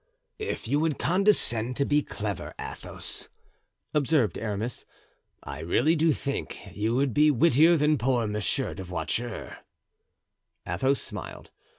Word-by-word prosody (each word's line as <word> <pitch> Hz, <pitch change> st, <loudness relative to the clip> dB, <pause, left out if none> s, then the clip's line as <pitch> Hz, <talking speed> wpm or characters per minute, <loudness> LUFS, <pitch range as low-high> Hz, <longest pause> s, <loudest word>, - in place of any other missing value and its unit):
"If 430 Hz, -, -4 dB
you 145 Hz, +5 st, +2 dB
would 155 Hz, -3 st, +1 dB
condescend 150 Hz, -, +2 dB
to 140 Hz, -, +2 dB
be 150 Hz, +1 st, +3 dB
clever, 105 Hz, -, -5 dB
Athos," -, -, -7 dB, 0.6 s
observed 145 Hz, -5 st, +2 dB
Aramis, 110 Hz, +2 st, -3 dB, 0.6 s
"I -, -, -7 dB
really 90 Hz, -, +2 dB
do 160 Hz, 0 st, +3 dB
think 140 Hz, -1 st, -3 dB, 0.2 s
you 110 Hz, +3 st, 0 dB
would 135 Hz, -1 st, +1 dB
be 150 Hz, +4 st, +5 dB
wittier 160 Hz, +4 st, +5 dB
than 150 Hz, -1 st, +3 dB
poor 120 Hz, -1 st, +1 dB
Monsieur 105 Hz, -1 st, 0 dB
de 95 Hz, -, -7 dB
Voiture." 90 Hz, +7 st, -3 dB, 1.1 s
Athos 130 Hz, +11 st, +1 dB
smiled. -, -, -6 dB
130 Hz, 125 wpm, -27 LUFS, 110-150 Hz, 1.1 s, be